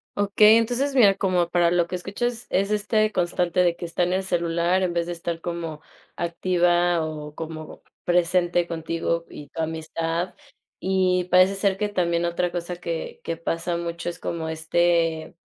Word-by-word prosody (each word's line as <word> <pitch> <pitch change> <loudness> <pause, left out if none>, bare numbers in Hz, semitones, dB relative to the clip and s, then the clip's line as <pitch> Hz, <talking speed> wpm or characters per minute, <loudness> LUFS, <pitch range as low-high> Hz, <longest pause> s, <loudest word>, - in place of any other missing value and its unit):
Okey, 210 +2 +5
entonces, 250 +5 0
mira, 200 -6 +6
como 180 -3 +1
para 175 -1 +3
lo 175 -1 +2
que 180 - -4
escuchas, 230 +6 -3
es 200 +2 +1
este 215 +1 +1
constante 180 -1 0
de 175 -1 +3
que 175 - -6
está 170 +1 -3
en 180 +1 +2
el 190 +1 0
celular 170 +1 +1
en 180 -2 0
vez 170 -1 0
de 175 - -5
estar 170 -1 -4
como 170 -3 -5 0.3
activa 175 -1 +1
o 150 -1 -7
como 160 -1 -8 0.2
presente 175 0 +2
contigo 165 0 -2
y 145 -1 -10
tu 165 - -5
amistad, 165 +2 -3 0.5
y 185 -1 +1
parece 185 +2 +5
ser 195 -1 0
que 210 0 -1
también 175 -3 0
otra 175 +1 -1
cosa 175 0 -4
que 170 -2 -5
que 165 -1 -3
pasa 170 +1 -2
mucho 170 0 -4
es 175 - -7
como, 160 -1 -4
este, 165 0 +1
175 Hz, 170 wpm, -24 LUFS, 170-185 Hz, 0.5 s, mira